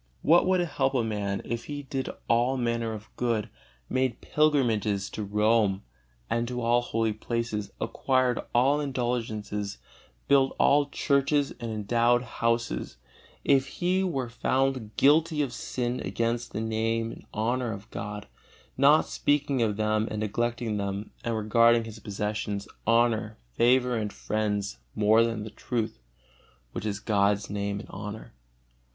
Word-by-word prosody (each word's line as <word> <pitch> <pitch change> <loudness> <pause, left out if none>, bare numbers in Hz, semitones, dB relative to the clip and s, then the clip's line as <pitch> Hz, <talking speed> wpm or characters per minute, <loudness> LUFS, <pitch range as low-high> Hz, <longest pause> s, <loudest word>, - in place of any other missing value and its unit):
What 170 +4 +5
would 185 -1 +3
it - - +1
help 135 -4 0
a 120 - +2
man 100 -3 -2
if 120 0 -4
he 145 -1 -5
did 135 -1 -3 0.2
all 120 +3 +2
manner 115 -2 -1
of 110 0 -10
good, 115 -3 -1 0.4
made 130 - 0
pilgrimages 115 -10 +1
to - - -5
Rome 105 -1 +2 0.4
and 115 0 0
to 125 0 -3
all 120 0 +3
holy 115 -2 0
places, 110 -2 -3
acquired 130 -2 +1
all 135 +5 +3
indulgences, 115 -6 -2 0.5
built 135 -1 +4
all 145 0 +4
churches 140 0 +1
and 120 -1 -4
endowed 120 +3 +2
houses, 115 - -1 0.5
if 135 -1 +3
he 180 +6 0
were 135 -9 -1
found 130 -1 -1
guilty 155 +2 +4
of 130 -4 -4
sin 125 -1 -3
against 115 +1 -1
the 110 - -3
Name 115 +1 -1
and - - -12
honor 120 +2 -1
of 100 0 -7
God, 105 0 -6 0.5
not 145 +3 +5
speaking 145 -3 +1
of 105 -3 +1
them 110 0 +1
and 110 - -3
neglecting 120 +1 -1
them, 100 +1 -3
and 115 -1 -1
regarding 115 +2 +4
his 110 -1 -9
possessions, 105 0 -3 0.2
honor, 115 -2 +2 0.2
favor 125 - +3
and 105 -2 -2
friends 105 - -2 0.2
more 110 +2 +5
than 115 -2 -2
the 110 - -7
truth 115 - -3 0.7
(which 110 - -4
is 100 -1 -2
God's 105 -1 +1
Name 100 0 -2
and - - -10
honor)? 105 +2 -7
115 Hz, 145 wpm, -27 LUFS, 105-130 Hz, 0.7 s, What